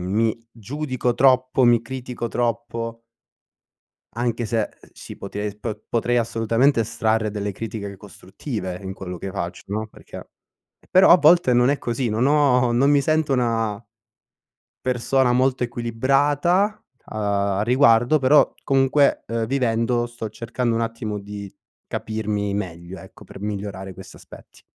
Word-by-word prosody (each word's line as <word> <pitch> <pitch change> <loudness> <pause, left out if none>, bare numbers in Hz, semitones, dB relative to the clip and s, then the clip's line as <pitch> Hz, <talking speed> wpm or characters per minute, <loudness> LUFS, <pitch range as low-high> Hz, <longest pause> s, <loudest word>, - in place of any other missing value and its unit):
mi 115 +1 0
giudico 125 +2 -3
troppo, 130 0 +3
mi 120 -1 +5
critico 125 0 -5
troppo 115 -1 -3 1.1
anche 120 0 -2
se 110 0 -1 0.2
si - - -11
pote 105 +1 -5
po 110 -1 -5
potrei 120 +1 0
assolutamente 115 +3 +2
estrarre 110 0 0
delle 105 -1 -3
critiche 100 -1 -6
costruttive 90 -1 -7
in 95 0 -6
quello 90 -2 -7
che 95 - -5
faccio 90 -3 -5
no, 110 +2 -3
perché, - - -12 0.6
però 185 +1 +6
a 175 - +10
volte 165 -5 +5
non 125 +2 +4
è 145 - 0
così, 120 0 -2
non 115 +4 +1
ho, 140 -4 +3
non 135 +4 +3
mi 145 -1 +4
sento 155 0 +1
una 115 -4 0 1.0
persona 125 0 +1
molto 130 0 +2
equilibrata, 140 - +1 0.3
a 100 -2 -1
riguardo, 120 +3 +4
però 140 +2 +4
comunque 135 +1 +2 0.2
vivendo 120 -1 0
sto 120 -2 -7
cercando 115 +2 -2
un 115 - 0
attimo, 115 -2 -4
di 100 -1 -8 0.3
capirmi 105 -2 -3
meglio 90 -2 -5
ecco, - - -14
per - - -12
migliorare 100 -2 -5
questi 95 +1 -12
aspetti. - - -15
115 Hz, 135 wpm, -22 LUFS, 105-130 Hz, 1.1 s, a